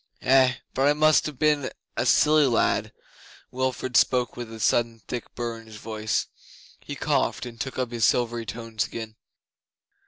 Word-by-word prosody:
Eh, 130 -1 +5 0.2
but 135 +2 +2
I 145 - +5
must 155 +1 +4
ha' 150 -4 -8
been 150 -2 +2 0.3
a - - 0
silly 150 -1 +5
lad.' 120 -3 +1 0.6
Wilfrid 130 -1 -2
spoke 125 0 +3
with 120 -2 -7
a 110 - -9
sudden 115 0 +1
thick 120 -2 -6
burr 115 -1 -4
in 115 - -16
his 110 - -12
voice. 110 0 -2 0.5
He - - -7
coughed, - - 0
and 115 -1 -8
took 135 - -5
up 125 -2 -2
his 120 -2 -2
silvery 120 -1 +1
tones 115 -1 -3
again. 110 -1 -7
120 Hz, 165 wpm, -25 LUFS, 115-130 Hz, 0.6 s, Eh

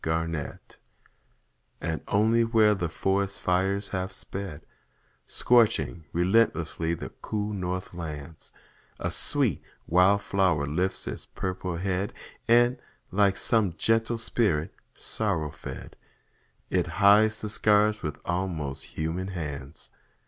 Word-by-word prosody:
FIRE 80 +1 0
FLOWERS 80 -4 -4 1.2
And 80 0 -3
only 110 +3 +3
where 110 -2 +4
the 90 -5 -2
forest 100 +3 0
fires 95 +3 0
have 95 -1 -3
sped, 95 -5 -7 0.6
Scorching 105 - +2
relentlessly 85 -3 +1
the - - -7
cool 105 0 -2
north 90 -1 -3
lands, 80 -2 -7 0.5
A - - -2
sweet 135 - +1 0.2
wild 95 +4 +4
flower 90 -8 +2
lifts 90 +6 -1
its - - -5
purple 90 -2 -4
head, 95 +2 -1 0.3
And, 120 +2 +4 0.3
like 100 0 +3
some 110 -6 +2
gentle 115 +1 +2
spirit 105 -9 0 0.2
sorrow 90 -9 0
fed, 75 - -9 0.8
It - - +1
hides 110 +2 +5
the 105 - -3
scars 105 0 +3
with 75 -2 -4
almost 85 -6 -2
human 80 +4 -2
hands. 75 -6 -6
95 Hz, 115 wpm, -27 LUFS, 80-105 Hz, 1.2 s, hides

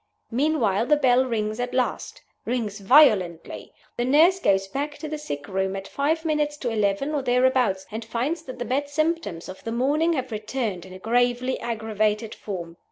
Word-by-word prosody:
Meanwhile 240 -5 +1
the 300 - +5
bell 260 -3 +3
rings 215 -2 -2
at 245 +1 -3
last 255 -1 -2 0.2
rings 225 -4 -2
violently. 195 - +3 0.3
The 240 - 0
nurse 320 +8 +5
goes 195 - +2
back 290 +7 -4
to 310 - -6
the 305 0 -4
sick 145 - -6
room 190 0 -1
at 195 0 -6
five 315 +7 -1
minutes 300 -1 0
to 245 -5 -3
eleven, 210 +6 0
or 290 - 0
thereabouts, 250 -6 +2
and 220 +2 -5
finds 245 +9 -2
that 255 - -8
the 245 - -4
bad 285 +3 -1
symptoms 310 - -1
of 185 - -10
the 225 - -4
morning 290 +8 +1
have 260 -4 -3
returned 215 -4 -3
in 185 - -12
a - - -8
gravely 245 +4 +1
aggravated 220 -1 -1
form. 175 -4 -7
245 Hz, 180 wpm, -24 LUFS, 210-285 Hz, 0.3 s, the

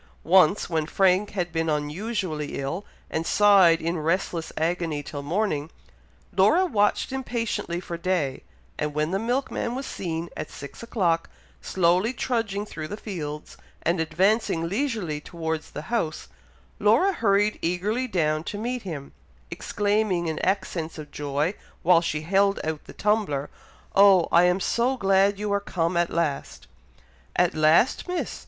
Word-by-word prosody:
Once, 185 +3 +4
when 160 -2 -1
Frank 190 +3 +3
had 175 -4 -2
been 165 -1 0
unusually 155 +1 -2
ill, 140 +8 -3 0.3
and 160 - -1
sighed 195 -5 +6
in 170 +1 -2
restless 165 +1 -1
agony 165 -2 -1
till 145 0 -6
morning, 155 -1 -1 0.7
Laura 375 - +5
watched 210 - +1
impatiently 235 -9 -2
for 175 -1 -6
day, 165 -7 -1 0.4
and 150 0 -2
when 150 +2 0
the 195 - 0
milkman 245 +1 -1
was 270 +1 -4
seen, 170 -6 -4
at - - -5
six 140 - -10
o'clock, 180 -8 0 0.3
slowly 185 +6 +2
trudging 225 -5 -1
through 155 -6 -6
the 210 - -6
fields, 150 -9 -6 0.3
and 170 +1 +1
advancing 165 +1 +1
leisurely 200 - -2
towards 160 -1 -4
the 150 - -7
house, 160 -10 -1 0.5
Laura 235 - +4
hurried 210 - +2
eagerly 205 +9 -1
down 155 -7 0
to 205 - -5
meet 245 +3 -3
him, 155 -8 -7 0.4
exclaiming 205 -4 0
in 160 -1 -2
accents 185 -4 -1
of 150 -1 -9
joy, 145 +4 -1 0.3
while 170 0 +5
she 150 -3 -2
held 195 +4 +2
out 155 -1 -3
the - - -11
tumbler, 205 -10 0 0.4
"Oh! 195 -3 +6
I 170 +1 +6
am 180 +1 +3
so 245 +6 +1
glad 195 -1 +3
you 205 0 -2
are 200 - +2
come 175 -3 -1
at 170 0 +2
last!" 160 -5 -2 0.7
"At 180 -1 +3
last, 155 - +3
Miss!! 360 0 -3
180 Hz, 145 wpm, -25 LUFS, 160-205 Hz, 0.7 s, sighed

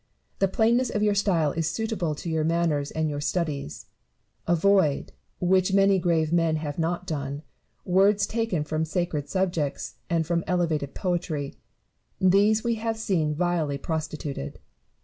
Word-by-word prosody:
The 195 - +3
plainness 235 +5 +2
of 210 - -1
your 210 -1 +3
style 180 -7 +2
is 165 +1 -1
suitable 210 -7 -2
to 160 - -8
your 160 -1 +1
manners 160 -3 +1
and 160 0 -1
your 145 -1 -3
studies. 150 - -3 0.6
Avoid, 175 -3 +2 0.3
which 185 +1 +2
many 195 -1 +4
grave 165 -2 +1
men 165 -2 +2
have 155 0 -4
not 175 +2 -1
done, 145 -3 -4 0.4
words 195 +3 +4
taken 225 -9 -1
from 155 +1 -2
sacred 160 -3 -2
subjects 175 -10 -2
and 165 -1 +1
from 170 +1 0
elevated 160 -6 0
poetry; 170 -6 -2 0.7
these 205 +4 +4
we 235 -1 0
have 225 -1 -1
seen 165 -9 0
vilely 165 -4 0
prostituted. 155 - -4
170 Hz, 145 wpm, -26 LUFS, 155-195 Hz, 0.7 s, many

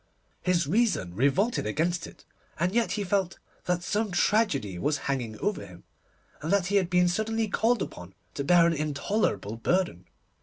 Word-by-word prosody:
His 180 -3 +1
reason 190 - +1
revolted 140 - +1
against 165 +9 -1
it, - - -16 0.3
and 175 +2 +1
yet 235 0 +1
he 205 - -2
felt 190 -1 0 0.3
that 175 -1 0
some 210 +4 -1
tragedy 180 - +1
was 150 - 0
hanging 120 -6 -2
over 205 0 -2
him, 90 -1 -13 0.6
and 155 - -3
that 200 -2 +3
he 200 +2 +2
had 185 -3 +1
been 180 0 +3
suddenly 220 +4 0
called 225 +2 +1
upon 90 +1 -10 0.2
to 140 - -3
bear 170 +3 +5
an 170 - +3
intolerable 145 - -1
burden. 115 - -1
175 Hz, 165 wpm, -27 LUFS, 140-205 Hz, 0.6 s, bear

